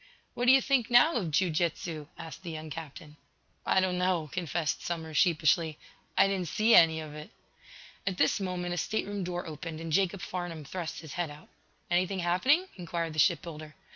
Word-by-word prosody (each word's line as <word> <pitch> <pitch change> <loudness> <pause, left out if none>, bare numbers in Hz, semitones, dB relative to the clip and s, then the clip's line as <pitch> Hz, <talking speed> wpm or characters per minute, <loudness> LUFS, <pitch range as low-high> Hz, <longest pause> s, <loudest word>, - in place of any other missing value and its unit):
"What 245 - -1
do - - +9
you 265 0 +6
think, 260 -4 +2
now, 245 +7 +6
of 190 - -1
jiu 170 +4 +2
jitsu?" 160 -1 -2
asked 165 0 -9
the 180 - -7
young 155 -1 -7
captain. 155 0 -9 0.5
"I - - +4
don't 185 -1 0
know," 180 -5 0
confessed 170 -3 -2
Somers, 160 -2 -4
sheepishly. 160 -2 +3 0.4
"I - - +7
didn't 190 -3 -1
see 215 +8 +3
any 160 -1 +7
of 155 -2 -7
it." 150 +1 -9 0.8
At 190 -2 -1
this - - +2
moment 180 -2 -3
a - - -3
stateroom 205 0 -2
door 175 0 -4
opened 160 0 -6
and 165 0 -6
Jacob 195 +1 +1
Farnum 175 -4 -5
thrust 170 +2 -5
his 160 -4 -9
head 175 -3 -2
out. 145 +1 -13 0.4
"Anything 185 +2 +1
happening?" 185 - +2
inquired 170 -2 -3
the 155 - -3
ship 160 +2 +4
builder. 155 -2 -9
175 Hz, 190 wpm, -29 LUFS, 160-185 Hz, 0.8 s, do